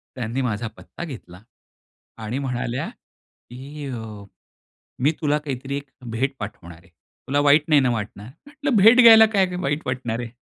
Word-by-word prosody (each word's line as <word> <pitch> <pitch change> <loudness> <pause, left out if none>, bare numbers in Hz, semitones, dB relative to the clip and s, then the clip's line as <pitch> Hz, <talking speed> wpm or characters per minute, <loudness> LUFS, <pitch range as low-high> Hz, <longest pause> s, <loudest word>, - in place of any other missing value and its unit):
त्यांनी 125 +1 -3
माझा 115 -2 -2
पत्ता - - -10
घेतला. 115 - -10 0.8
आणि 115 +4 -4
म्हणाल्या, 125 -2 -3 0.6
की 140 +4 -9
अ, 125 -3 -5 1.0
"मी 150 - +4
तुला 150 -1 +2
काहीतरी 135 0 -4
एक 140 -1 -9 0.2
भेट 135 +4 -1
पाठवणार 85 -5 -8
आहे, 95 - -23
तुला 130 - -5
वाईट 145 +1 +5
नाही 150 -2 +5
ना 130 - +2
वाटणार." 105 -2 -5 0.2
म्हंटलं, 290 -2 -3
"भेट 235 +4 +8
घ्यायला 225 -2 +9
काय 190 - +4
वाईट 150 -2 -1
वाटणार 120 -3 -3
आहे." 120 -1 -5
135 Hz, 155 wpm, -22 LUFS, 115-150 Hz, 1.0 s, घ्यायला